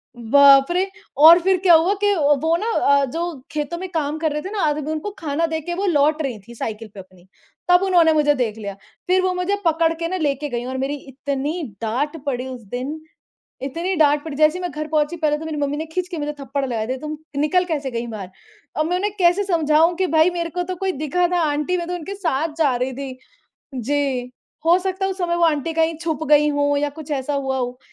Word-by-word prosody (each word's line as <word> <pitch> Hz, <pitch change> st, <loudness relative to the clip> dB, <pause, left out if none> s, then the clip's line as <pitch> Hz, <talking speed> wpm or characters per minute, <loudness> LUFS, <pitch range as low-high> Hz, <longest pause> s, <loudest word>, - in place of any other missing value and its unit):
बाप 275 Hz, +5 st, +6 dB
रे! 375 Hz, +2 st, +1 dB, 0.3 s
और 325 Hz, +4 st, +9 dB
फिर 375 Hz, +1 st, +2 dB
क्या 350 Hz, -2 st, +7 dB
हुआ 335 Hz, +5 st, +5 dB
कि 410 Hz, 0 st, +4 dB
वो 295 Hz, +1 st, +2 dB
ना 435 Hz, -, -3 dB
अ, 280 Hz, -6 st, +3 dB
जो 330 Hz, +2 st, -4 dB
खेतों 305 Hz, +3 st, -3 dB
में 375 Hz, +1 st, -5 dB
काम 305 Hz, -2 st, -2 dB
कर 315 Hz, -1 st, 0 dB
रहे 300 Hz, +1 st, -2 dB
थे 380 Hz, -, -6 dB
ना 420 Hz, -, -2 dB
आदमी 300 Hz, 0 st, 0 dB
उनको 315 Hz, +7 st, -3 dB
खाना 315 Hz, +1 st, -1 dB
देके 320 Hz, +2 st, -3 dB
वो 395 Hz, +2 st, -2 dB
लौट 305 Hz, -2 st, +2 dB
रहीं 250 Hz, -7 st, -3 dB
थी, 235 Hz, -, -11 dB
साइकिल 220 Hz, 0 st, -5 dB
पे 200 Hz, -, -10 dB
अपनी, 185 Hz, -1 st, -15 dB, 0.4 s
तब 355 Hz, 0 st, +6 dB
उन्होंने 345 Hz, -4 st, +4 dB
मुझे 295 Hz, -1 st, +3 dB
देख 225 Hz, -5 st, -2 dB
लिया। 200 Hz, -2 st, -6 dB, 0.3 s
फिर 370 Hz, 0 st, +3 dB
वो 370 Hz, 0 st, 0 dB
मुझे 360 Hz, +3 st, 0 dB
पकड़ 330 Hz, 0 st, +2 dB
के 335 Hz, -, -1 dB
ना 370 Hz, -, -2 dB
लेके 295 Hz, -2 st, -1 dB
गईं, 240 Hz, -1 st, -3 dB
और 260 Hz, +1 st, -4 dB
मेरी 270 Hz, +2 st, -2 dB
इतनी 280 Hz, +5 st, -3 dB, 0.2 s
डाँट 260 Hz, +8 st, -2 dB
पड़ी 255 Hz, -2 st, -2 dB
उस 255 Hz, -2 st, -7 dB
दिन, 280 Hz, +5 st, -4 dB, 0.6 s
इतनी 335 Hz, +8 st, -2 dB
डाँट 295 Hz, -1 st, +3 dB
पड़ी, 310 Hz, -4 st, -6 dB
जैसे 310 Hz, +3 st, +3 dB
ही 365 Hz, -, -6 dB
मैं 355 Hz, -, -2 dB
घर 305 Hz, 0 st, -5 dB
पहुँची 310 Hz, +2 st, 0 dB
पहले 300 Hz, -2 st, 0 dB
तो 320 Hz, -, -7 dB
मेरी 315 Hz, -1 st, -4 dB
मम्मी 285 Hz, 0 st, -1 dB
ने 315 Hz, +2 st, -4 dB
खींच 365 Hz, +1 st, -2 dB
के 350 Hz, -3 st, -5 dB
मुझे 295 Hz, 0 st, -3 dB
थप्पड़ 275 Hz, 0 st, -3 dB
लगाए 225 Hz, -3 st, -2 dB
दिए, 255 Hz, +2 st, -3 dB
तुम 305 Hz, +1 st, -5 dB, 0.2 s
निकल 360 Hz, +5 st, +2 dB
कैसे 295 Hz, -6 st, -3 dB
गई 235 Hz, 0 st, -3 dB
बाहर। 205 Hz, -5 st, -7 dB, 0.5 s
अब 310 Hz, -, +1 dB
मैं 355 Hz, +2 st, 0 dB
उन्हें 405 Hz, +2 st, -1 dB
कैसे 360 Hz, +2 st, +3 dB
समझाऊँ 325 Hz, -2 st, +3 dB
कि 375 Hz, +1 st, +1 dB
भाई 320 Hz, +1 st, +4 dB
मेरे 340 Hz, -1 st, -3 dB
को 355 Hz, +2 st, -2 dB
तो 365 Hz, +1 st, -5 dB
कोई 380 Hz, +1 st, -1 dB
दिखा 310 Hz, +4 st, 0 dB
था, 355 Hz, -, +2 dB
आंटी 300 Hz, +3 st, 0 dB
मैं 345 Hz, -1 st, -3 dB
तो 360 Hz, -, -2 dB
उनके 355 Hz, +3 st, -6 dB
साथ 325 Hz, -5 st, -1 dB
जा 290 Hz, -5 st, +3 dB
रही 255 Hz, +2 st, -2 dB
थी। 265 Hz, 0 st, -7 dB, 0.6 s
जी, 260 Hz, 0 st, -1 dB, 0.3 s
हो 340 Hz, +2 st, +5 dB
सकता 380 Hz, +1 st, -3 dB
है 385 Hz, -, 0 dB
उस 380 Hz, -, -6 dB
समय 345 Hz, -2 st, 0 dB
वो 345 Hz, -, +3 dB
आंटी 320 Hz, 0 st, +1 dB
कहीं 325 Hz, 0 st, +1 dB
छुप 320 Hz, -2 st, -3 dB
गई 300 Hz, 0 st, +5 dB
हों 285 Hz, 0 st, +1 dB
या 290 Hz, 0 st, 0 dB
कुछ 305 Hz, -, -10 dB
ऐसा 285 Hz, 0 st, -2 dB
हुआ 270 Hz, -1 st, -1 dB
हो। 250 Hz, 0 st, -3 dB
305 Hz, 240 wpm, -21 LUFS, 275-345 Hz, 0.6 s, और